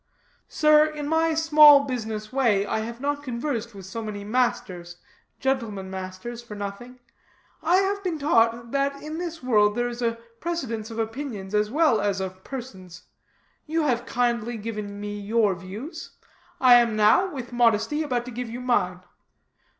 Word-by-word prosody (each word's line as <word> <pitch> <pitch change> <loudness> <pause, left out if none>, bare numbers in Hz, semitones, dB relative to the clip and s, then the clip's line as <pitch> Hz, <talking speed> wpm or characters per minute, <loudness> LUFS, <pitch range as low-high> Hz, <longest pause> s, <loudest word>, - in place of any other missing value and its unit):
"Sir, 305 0 +5
in 300 -1 -5
my 320 +1 +2
small 300 -3 +7
business 220 -4 -5
way, 225 -7 +2
I 220 - -1
have 230 +2 -6
not 285 +2 -2
conversed 235 -3 -4
with 195 -2 -10
so 210 +5 -6
many 210 -2 -6
masters, 190 -6 -1 0.4
gentlemen 225 -8 -2
masters, 190 +5 -6
for 235 -3 -10
nothing. 205 +5 -7 0.6
I 340 +3 +3
have 395 +1 +1
been 355 -4 -2
taught 235 -5 +2
that 280 0 0
in 310 +2 -5
this 335 -4 -5
world 210 -4 +3
there 240 0 0
is 240 0 -6
a 230 -1 0 0.2
precedence 255 -10 -3
of 225 - -8
opinions 225 -4 -4
as 210 0 +2
well 300 -2 +3
as 200 -1 0
of 190 0 -6
persons. 190 -10 -9 0.6
You 320 +1 0
have 245 -3 0
kindly 240 -1 0
given 210 -2 -6
me 205 0 -5
your 210 0 +2
views, 210 - -9 0.4
I 250 -2 +8
am 230 -2 0
now, 215 - +4
with 250 -4 -7
modesty, 240 +5 +2
about 250 -6 -1
to 250 - -7
give 245 0 -5
you 235 +2 -6
mine." 185 -8 0
235 Hz, 165 wpm, -25 LUFS, 210-280 Hz, 0.6 s, I